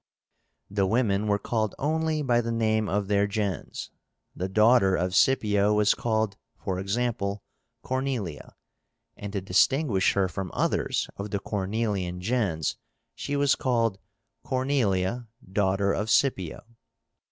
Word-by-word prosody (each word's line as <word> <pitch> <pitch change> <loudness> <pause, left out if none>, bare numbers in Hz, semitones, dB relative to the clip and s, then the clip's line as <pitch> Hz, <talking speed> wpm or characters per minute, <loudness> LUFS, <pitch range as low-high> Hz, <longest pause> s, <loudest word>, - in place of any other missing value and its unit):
The 100 -1 0
women 105 -2 +1
were 100 -1 +2
called 110 -1 -2
only 155 +1 0
by 120 -3 +3
the 115 0 -3
name 110 -2 +1
of 100 0 0
their 100 0 +2
gens. 100 -3 -3 0.4
The 95 +1 -3
daughter 110 -1 +4
of 90 +1 -1
Scipio 105 -4 +3
was 105 0 +4
called, 110 -3 -1 0.2
for 95 -2 -3
example, 100 0 -2 0.4
CORNELIA, 130 - -3 0.6
and 100 -1 -7
to 100 - -1
distinguish 100 - +2
her 100 -1 +2
from 90 +1 -5
others - - 0
of 100 +1 -5
the 100 - -1
Cornelian 100 -3 -2
gens 95 -6 -1 0.4
she 145 - -4
was 140 0 +3
called 115 -6 0 0.4
Cornelia 120 -5 0 0.2
daughter 100 0 +1
of 110 +2 -2
Scipio. 95 - +1
105 Hz, 130 wpm, -27 LUFS, 95-120 Hz, 0.6 s, daughter